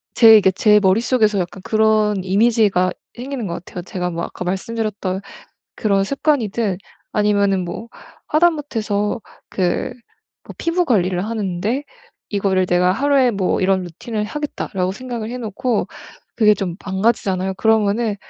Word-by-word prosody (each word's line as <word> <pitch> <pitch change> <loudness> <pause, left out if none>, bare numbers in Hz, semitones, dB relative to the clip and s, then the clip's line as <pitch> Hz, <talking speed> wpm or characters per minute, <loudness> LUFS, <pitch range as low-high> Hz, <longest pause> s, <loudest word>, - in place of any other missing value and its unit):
제 225 -2 +8
이게 190 -2 +4
제 210 +2 +4
머릿속에서 215 +1 +2
약간 180 +1 -4
그런 215 -2 +2
이미지가 200 -2 +2 0.2
생기는 250 -2 -5
것 170 0 -5
같아요. 180 - -7
제가 180 0 -3
뭐 170 -1 -4
아까 180 - -6
말씀드렸던 195 0 -3 0.5
그런 200 -2 +1
습관이든 235 - 0 0.4
아니면은 200 -3 +2
뭐 190 +6 -7 0.4
하다못해서 255 -10 0 0.3
그 185 +5 -1 0.7
피부 340 +2 +1
관리를 185 - +1
하는데 215 +3 -2 0.5
이거를 195 -2 +1
내가 180 +1 +3
'하루에 275 +1 +3
뭐 195 -4 0
이런 190 0 +2
루틴을 210 +5 -5
하겠다.'라고 210 -9 -3
생각을 235 -1 -6
해 250 - -5
놓고 230 0 -2 0.5
그게 210 -2 +5
좀 185 -4 -4
망가지잖아요. 190 -1 0
그러면은 220 +1 +1
210 Hz, 320 characters per minute, -19 LUFS, 190-230 Hz, 0.7 s, 제